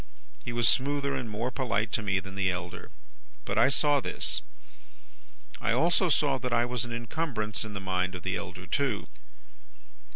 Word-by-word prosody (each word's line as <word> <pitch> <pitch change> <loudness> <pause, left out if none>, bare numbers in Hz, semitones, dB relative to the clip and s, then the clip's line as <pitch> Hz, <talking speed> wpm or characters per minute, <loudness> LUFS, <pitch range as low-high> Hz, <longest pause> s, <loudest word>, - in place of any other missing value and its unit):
He 120 - -4
was 120 -1 +3
smoother 140 +1 +2
and 115 - -3
more 115 +4 -2
polite 115 -4 0
to - - +1
me 100 -2 +1
than 95 +1 -9
the 95 -1 +1
elder; 90 -1 -5 0.6
but 100 - 0
I 115 - +6
saw 145 +1 +3
this. - - 0 1.2
I 115 -1 +2
also 170 +7 +3
saw 140 -4 +3
that 125 0 -3
I 120 0 +3
was 125 -2 -2
an 120 - -7
incumbrance 115 -3 -2
in 110 -1 -7
the - - -2
mind 95 -1 -1
of 90 - -7
the - - -1
elder, 90 0 -6
too. 110 - 0
115 Hz, 175 wpm, -29 LUFS, 100-135 Hz, 1.2 s, I